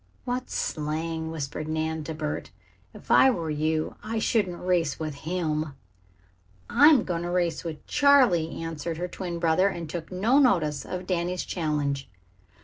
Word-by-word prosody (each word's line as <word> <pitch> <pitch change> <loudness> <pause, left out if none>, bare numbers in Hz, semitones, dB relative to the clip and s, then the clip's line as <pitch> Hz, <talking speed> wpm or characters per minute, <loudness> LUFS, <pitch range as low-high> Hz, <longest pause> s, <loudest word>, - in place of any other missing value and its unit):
"What 250 +1 -3
slang!" 160 +1 -2
whispered 155 -1 -4
Nan, 160 0 -2
to 160 - -5
Bert. 150 -1 -4 0.4
"If - - -9
I 265 - +7
were 165 -10 -1
you 155 +1 -1
I 225 +1 -3
shouldn't 205 -5 0
race 175 -5 +1
with 155 -2 -3
him." 155 -1 -2 0.9
"I'm 290 -5 +6
going 170 -2 -2
to 175 - -3
race 175 -2 0
with 160 -3 -6
Charley," 250 - +3
answered 165 0 -4
her 175 +2 -2
twin 175 -1 -5
brother, 170 +3 +3
and 170 -4 -5
took 160 +2 -6
no 220 +9 +3
notice 155 - +2
of 185 0 -5
Danny's 180 0 -1
challenge. 145 -5 -2
165 Hz, 150 wpm, -26 LUFS, 155-185 Hz, 0.9 s, I